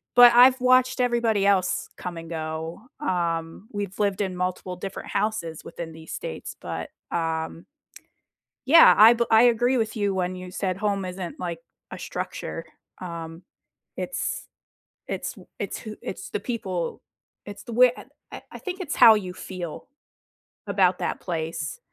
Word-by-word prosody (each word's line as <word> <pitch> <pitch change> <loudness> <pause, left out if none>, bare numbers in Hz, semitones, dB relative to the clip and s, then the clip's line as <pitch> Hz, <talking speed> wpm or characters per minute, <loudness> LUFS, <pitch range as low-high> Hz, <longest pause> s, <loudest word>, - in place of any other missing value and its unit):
but 245 -1 +9
I've 255 +2 +7
watched 255 0 +4
everybody 235 -4 +2
else 195 -2 +2
come 175 -1 -6
and 165 0 -8
go. 160 +2 -5 0.2
Um, 170 - -2
we've 205 -2 -5
lived 200 -1 +1
in 190 -2 -2
multiple 180 0 -3
different 195 +1 -7
houses 200 -6 -2
within 165 -1 -7
these 160 0 -11
states 80 - -6
but, - - -5 0.2
um 165 0 -2 1.0
yeah, 330 +5 +9
I 220 +3 +9
be 235 0 +1
I 225 +1 +7
agree 245 +2 +3
with 225 -1 -1
you 205 -2 0
when 185 -1 -1
you 180 0 -8
said 185 0 -2
home 200 -1 -1
isn't, 180 -1 -6
like, 170 -2 -3 0.3
a - - -7
structure, - - -5 0.4
um, 170 -1 -7 0.5
it's - - -3 0.6
it's - - -4
w - - -16
it's - - -3
who 215 -2 -8
it's - - -6
the - - -1
people 195 -9 -3 0.4
it's 205 0 -9
the 240 - -8
way 250 +1 +6
I - - -10 0.3
I - - -8
I - - -7
think 370 0 -5
it's 340 -6 -3
how 225 - +9
you 185 -4 -3
feel 180 -3 -7 0.8
about 185 -3 +3
that - - -2
place. 160 -3 -4
190 Hz, 160 wpm, -25 LUFS, 170-225 Hz, 1.0 s, but